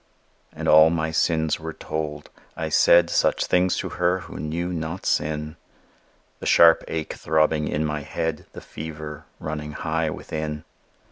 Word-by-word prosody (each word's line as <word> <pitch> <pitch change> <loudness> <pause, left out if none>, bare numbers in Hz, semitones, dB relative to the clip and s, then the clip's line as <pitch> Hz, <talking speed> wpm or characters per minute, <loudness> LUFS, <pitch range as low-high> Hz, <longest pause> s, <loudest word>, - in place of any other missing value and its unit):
And - - -5
all 80 +1 +7
my 80 -1 -1
sins 80 -1 +1
were 80 0 -6
told; 75 -2 -5 0.3
I - - -3
said 85 0 +5
Such - - +1
things 90 0 +2
to - - -3
her 90 +1 0
who - - -9
knew 85 +4 -3
not 80 +2 -5
sin 75 +1 -1 0.8
The - - -5
sharp 85 -1 +6
ache 80 -1 -4
throbbing 75 -1 +1
in 75 +1 -1
my 75 -1 -2
head, 80 +1 -4
The - - -9
fever 75 -1 -8
running 75 -1 -5
high 80 +1 -1
within. 75 +1 -5
80 Hz, 150 wpm, -24 LUFS, 75-80 Hz, 0.8 s, all